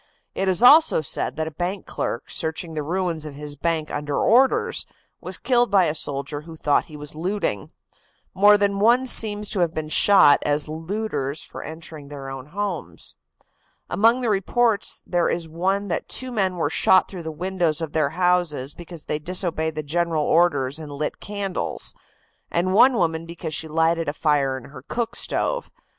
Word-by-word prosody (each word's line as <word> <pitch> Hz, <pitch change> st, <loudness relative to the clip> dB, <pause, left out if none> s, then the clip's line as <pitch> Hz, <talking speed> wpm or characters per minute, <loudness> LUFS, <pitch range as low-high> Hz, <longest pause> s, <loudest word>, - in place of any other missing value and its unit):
It 195 Hz, -, -2 dB
is 185 Hz, +3 st, +2 dB
also 300 Hz, -, +7 dB
said 145 Hz, -, -2 dB
that 160 Hz, -, -2 dB
a -, -, -5 dB
bank 180 Hz, +5 st, -4 dB
clerk, 115 Hz, -, -4 dB
searching 160 Hz, +1 st, -3 dB
the 155 Hz, -, -2 dB
ruins 165 Hz, 0 st, -2 dB
of 145 Hz, -, -9 dB
his 145 Hz, 0 st, -5 dB
bank 160 Hz, +1 st, -2 dB
under 145 Hz, 0 st, -3 dB
orders, 260 Hz, +4 st, +3 dB, 0.3 s
was -, -, -2 dB
killed 245 Hz, -2 st, +2 dB
by 195 Hz, -3 st, +4 dB
a 155 Hz, -, 0 dB
soldier 145 Hz, -1 st, -3 dB
who 165 Hz, +1 st, -11 dB
thought 150 Hz, -2 st, +1 dB
he 150 Hz, -, -11 dB
was 150 Hz, 0 st, -8 dB
looting. 165 Hz, -, -2 dB, 0.6 s
More 205 Hz, +2 st, +6 dB
than 200 Hz, -1 st, 0 dB
one 240 Hz, +5 st, +4 dB
seems 210 Hz, -4 st, +1 dB
to 200 Hz, -, -2 dB
have 170 Hz, -2 st, +1 dB
been 155 Hz, -1 st, -4 dB
shot 155 Hz, -5 st, +6 dB
as 145 Hz, 0 st, +2 dB
looters 160 Hz, -3 st, -3 dB
for -, -, -9 dB
entering 160 Hz, -2 st, -9 dB
their 140 Hz, -2 st, -8 dB
own 135 Hz, 0 st, -8 dB
homes. 195 Hz, 0 st, -5 dB, 0.8 s
Among 230 Hz, +7 st, +3 dB
the 240 Hz, -, 0 dB
reports 210 Hz, +2 st, 0 dB
there 175 Hz, -1 st, +1 dB
is 170 Hz, -1 st, -2 dB
one 190 Hz, +5 st, -1 dB
that 170 Hz, -, -3 dB
two 255 Hz, -1 st, -2 dB
men 190 Hz, -5 st, 0 dB
were 160 Hz, -4 st, -1 dB
shot 185 Hz, +2 st, +4 dB
through 185 Hz, -3 st, -8 dB
the 160 Hz, -1 st, -5 dB
windows 175 Hz, -1 st, -1 dB
of 160 Hz, -3 st, -5 dB
their 155 Hz, -3 st, +2 dB
houses 175 Hz, -5 st, 0 dB
because 170 Hz, -2 st, -9 dB
they 150 Hz, -, -2 dB
disobeyed 160 Hz, -1 st, -1 dB
the 155 Hz, -, -3 dB
general 165 Hz, +1 st, 0 dB
orders 150 Hz, -4 st, +2 dB
and 150 Hz, -2 st, -8 dB
lit 145 Hz, +1 st, -4 dB
candles, 200 Hz, -2 st, -4 dB, 0.6 s
and 180 Hz, +2 st, 0 dB
one 250 Hz, +5 st, +6 dB
woman 165 Hz, -4 st, 0 dB
because 165 Hz, -2 st, -6 dB
she 160 Hz, -, -2 dB
lighted 165 Hz, +1 st, +1 dB
a -, -, -3 dB
fire 145 Hz, -4 st, +1 dB
in 130 Hz, +1 st, -12 dB
her 130 Hz, -, -10 dB
cook 230 Hz, -, -3 dB
stove. -, -, -2 dB
165 Hz, 180 wpm, -23 LUFS, 150-195 Hz, 0.8 s, also